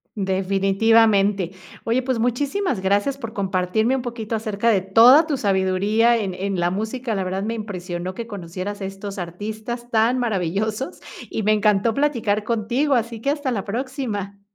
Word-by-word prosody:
Definitivamente. 195 0 +2 0.3
Oye, 235 +3 +1
pues, 255 -2 -1
muchísimas 265 - 0
gracias 205 +8 +1
por 230 -5 -6
compartirme 200 +3 0
un 265 - -2
poquito 235 -2 -4
acerca 215 0 0
de 200 -4 +3
toda 230 - +7
tu 295 -4 -1
sabiduría 200 +3 +2
en 200 -4 -2
en 190 0 -3
la 175 0 +2
música, 220 +5 -3
la 195 - -1
verdad 190 +1 -3
me 225 +2 -2
impresionó 185 -4 -5
que 230 +4 -6
conocieras 195 0 -6
estos 195 +1 -6
artistas 220 +7 -6
tan 230 +2 +2
maravillosos 215 +2 -2 0.3
y 220 - -3
me 215 +1 +4
encantó 210 +1 +2
platicar 230 -7 0
contigo, 240 +6 0
así 230 -1 -2
que 275 - 0
hasta 285 -2 -1
la 205 -5 -2
próxima. 215 -4 -4
215 Hz, 155 wpm, -22 LUFS, 195-235 Hz, 0.3 s, toda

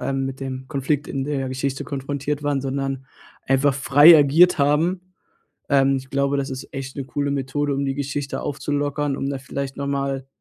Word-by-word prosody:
ähm 135 0 -1
mit 135 0 -5
dem 130 -1 -5
Konflikt 145 0 -1
in 135 -1 -3
der 135 -3 -2
Geschichte 130 +1 -3
konfrontiert 140 +1 -3
waren, 145 -2 0
sondern 135 0 -3 0.4
einfach 135 +1 +3
frei 145 +4 +7
agiert 160 +5 +5
haben. 160 +6 +2 0.7
Ähm, 135 -1 +3
ich 130 0 -9
glaube, 140 0 +1
das 135 0 -2
ist 130 +1 -7
echt 135 -1 -6
'ne 135 -2 -4
coole 140 +1 -2
Methode, 140 +1 -1
um 140 +1 -1
die 135 0 -2
Geschichte 140 0 -3
aufzulockern, 145 0 -2
um 135 - -2
da 135 -1 -3
vielleicht 140 0 -5
noch 140 0 -3
mal 135 -1 -2
140 Hz, 185 wpm, -22 LUFS, 135-145 Hz, 0.7 s, frei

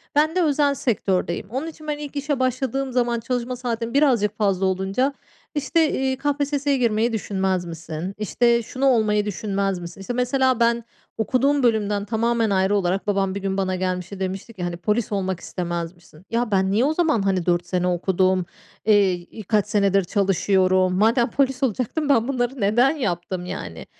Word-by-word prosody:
Ben 310 +3 +3
de 365 - +3
özel 285 -2 +2
sektördeyim. 195 -7 -1
Onun 265 +8 -3
için 310 -1 -10
ben 300 -1 -1
ilk 295 -1 -8
işe 285 -1 -1
başladığım 265 +1 -1
zaman 240 -1 +1
çalışma 245 +1 -2
saatim 235 -1 -3
birazcık 240 -8 +2
fazla 195 -3 +1
olunca, 190 +9 0 0.4
işte, 300 +2 +2
eee, 265 0 0
"KPSS'ye 285 0 0
girmeyi 230 -1 +1
düşünmez 190 -4 -1
misin? 165 +2 -6
İşte, 235 +3 +2
şunu 260 +4 -3
olmayı 215 -5 +3
düşünmez 195 -2 -2
misin?" 175 +2 -9
İşte, 220 +6 -4
mesela 255 0 +1
ben, 235 0 +2 0.3
okuduğum 270 +5 +1
bölümden 210 -3 +1
tamamen 230 +1 +1
ayrı 190 +1 +2
olarak 195 0 0
babam 195 -2 0
bir 200 - -4
gün 195 0 -2
bana 190 -1 0
gelmişti, 185 +1 -3
demişti 190 +4 -4
ki, 185 - -6
hani, 175 -1 -3
"Polis 210 +5 -1
olmak 190 -3 -1
istemez 170 -1 -4
misin?" 170 0 -20
"Ya, 230 0 -1
ben 190 -1 +2
niye 220 +6 +3
o 300 - +1
zaman, 315 - +2
hani, 190 -3 0
4 175 0 +1
sene 180 -1 0
okudum? 185 +1 +1 0.4
Eee, 205 -3 +4
i 180 +5 -8
kaç 210 +1 +1
senedir 200 -2 +2
çalışıyorum. 185 -1 +2
Madem 230 +5 +3
polis 270 0 0
olacaktım, 260 - -1
ben 240 -4 +3
bunları 255 -1 -2
neden 225 +6 +4
yaptım, 180 - -3
yani?" 85 - -6
210 Hz, 175 wpm, -23 LUFS, 190-255 Hz, 0.4 s, Eee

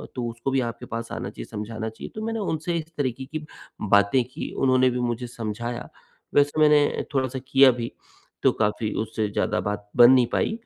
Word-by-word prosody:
तो 120 -2 -2
उसको 115 +3 -4
भी 135 - +2
आपके 115 -2 -6
पास 115 +1 -5
आना - - -4
चाहिए, - - -8
समझाना 110 +1 -5
चाहिए। 110 - -9
तो 215 - -5
मैंने 225 0 -2
उनसे 170 -3 -2
इस 160 0 -6
तरीके 130 -2 -2
की 150 +2 -6 0.4
बातें 100 +5 +4
की। - - -5
उन्होंने 130 -1 +4
भी 125 0 -2
मुझे 120 0 -2
समझाया। 120 0 -5 0.5
वैसे 145 +2 +3
मैंने 150 -1 +4
थोड़ा-सा 130 -1 0
किया 135 -1 +7
भी 120 -1 -4 0.5
तो - - +6
काफ़ी 105 0 -1
उससे 110 -1 -2
ज़्यादा - - 0
बात 105 0 -4
बन 120 +1 +9
नहीं 130 -2 +6
पाई। 220 - 0
125 Hz, 190 wpm, -25 LUFS, 115-140 Hz, 0.5 s, बन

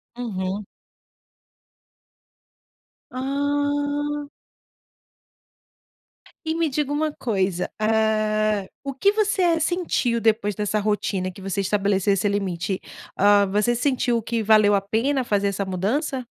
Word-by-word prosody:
Uhum. 200 -4 -4 2.5
Ah. 285 +2 -1 2.2
E 320 - -1
me 330 -1 +1
diga 290 0 -1
uma 305 +1 0
coisa: 190 -9 -1
Ah, 215 -1 +1 0.2
o 275 -1 -4
que 395 +10 +3
você 390 -6 +2
sentiu 320 -9 0
depois 215 -2 +1
dessa 210 +1 -1
rotina 200 -3 -1
que 195 - -13
você 195 +1 -2
estabelece 200 0 +1
esse 195 +1 +1
limite? 190 -2 -2 0.4
Ah, 205 0 +5
você 210 +5 +1
sentiu 245 -2 +1
que 230 +1 -2
valeu 215 -1 +5
a 195 - +3
pena 250 +7 0
fazer 205 -3 +1
essa 200 0 -2
mudança? 245 - -2
220 Hz, 110 wpm, -23 LUFS, 200-285 Hz, 2.5 s, Ah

